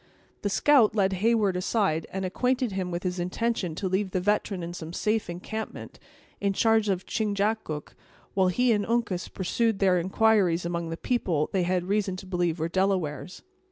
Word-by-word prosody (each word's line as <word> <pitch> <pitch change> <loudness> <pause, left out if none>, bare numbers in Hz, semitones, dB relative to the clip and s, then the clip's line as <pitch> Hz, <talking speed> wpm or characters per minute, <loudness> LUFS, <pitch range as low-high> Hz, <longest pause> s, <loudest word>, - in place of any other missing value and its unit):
The 205 - -1
scout 240 -1 +4
led 195 -2 +2
Heyward 210 0 +2
aside, 180 -4 0
and 190 0 -3
acquainted 250 +5 0
him 190 -1 -2
with 175 0 -4
his 180 -1 -2
intention 180 -1 -1
to 190 - -2
leave 190 +2 0
the 185 - -1
veteran 200 -1 0
in 170 +1 -5
some 165 -1 -7
safe 215 +1 0
encampment, 220 +6 -6 0.4
in 200 -1 0
charge 225 0 +3
of 190 -1 -1
Chingachgook, 205 -7 -2 0.4
while 190 -1 +3
he 245 +7 +2
and 210 -2 +2
Uncas 230 -5 -1
pursued 220 +3 0
their 185 -2 +3
inquires 185 -2 +2
among 170 -1 -2
the 165 - -4
people 175 - 0
they 190 - +2
had 180 0 0
reason 200 -1 0
to 185 - -9
believe 175 -3 -1
were 160 0 -1
Delawares. 180 -3 -1
190 Hz, 175 wpm, -27 LUFS, 180-215 Hz, 0.4 s, scout